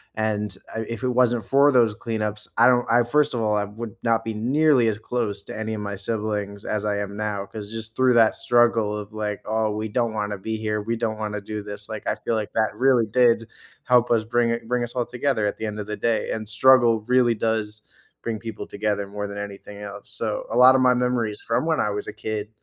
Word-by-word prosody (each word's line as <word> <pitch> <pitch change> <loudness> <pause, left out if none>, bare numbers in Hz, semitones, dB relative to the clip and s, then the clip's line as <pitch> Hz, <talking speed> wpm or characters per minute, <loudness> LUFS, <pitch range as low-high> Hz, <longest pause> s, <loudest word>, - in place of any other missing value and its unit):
and 105 -1 -2 0.2
I - - -2
if 115 -1 -5
it 130 - +1
wasn't 120 -2 +2
for 140 +1 +4
those 120 -4 +4
cleanups, 105 -2 -3
I 115 - +6
don't 125 -1 +4
I 120 0 +5
first 150 +4 +2
of 115 - -1
all, 105 -1 +1
I 105 - 0
would 110 +2 -8
not 115 -1 +2
be 110 - -3
nearly 130 +3 +3
as 110 -2 0
close 110 -4 -2
to - - -8
any 110 0 -3
of 105 - -5
my 100 -1 -4
siblings 105 -1 -2
as 105 -1 -1
I 105 -1 0
am 100 0 -4
now, 105 -2 -3
'cause 105 0 -8
just 115 0 -2
through 130 -1 +4
that 115 -2 +5
struggle 115 -3 +3
of, 105 +1 -8
like, 105 -1 -3
"Oh, 110 0 0
we 110 +1 -3
don't 115 0 0
wanna 105 -1 -2
be 110 +3 -3
here, 105 -1 -2
we 115 +2 -2
don't 110 -2 -2
wanna 105 -1 -3
do 105 +1 -5
this," 105 0 -7
like, 110 -2 -6
I - - +1
feel 110 +2 -3
like 105 -2 -3
that 110 -1 0
really 125 -3 +3
did 115 0 +3 0.4
help 125 -1 +4
us 110 -2 +2
bring 120 +1 +1
i 115 - -2
bring 125 +1 -1
us 120 - -4
all 120 -2 0
together 125 -2 -1
at - - -3
the 110 - -4
end 105 0 -5
of 105 - -4
the 105 - -3
day, 115 -1 0
and 110 -1 -4
struggle 120 0 +5
really 125 -2 +3
does 110 -1 -2 0.4
bring 115 -2 -3
people 115 0 -7
together 105 -1 -2
more 105 +1 -5
than 100 - -7
anything 100 0 -8
else. 100 0 -8
So, 110 -2 -2
a 115 - -1
lotta 130 +1 +7
my 130 -1 +5
memories 125 -4 0
from 115 +6 -1
when 160 -2 +1
I 105 - +1
was 105 - -4
a - - -6
kid, 110 -1 -4
110 Hz, 240 wpm, -23 LUFS, 105-120 Hz, 0.4 s, lotta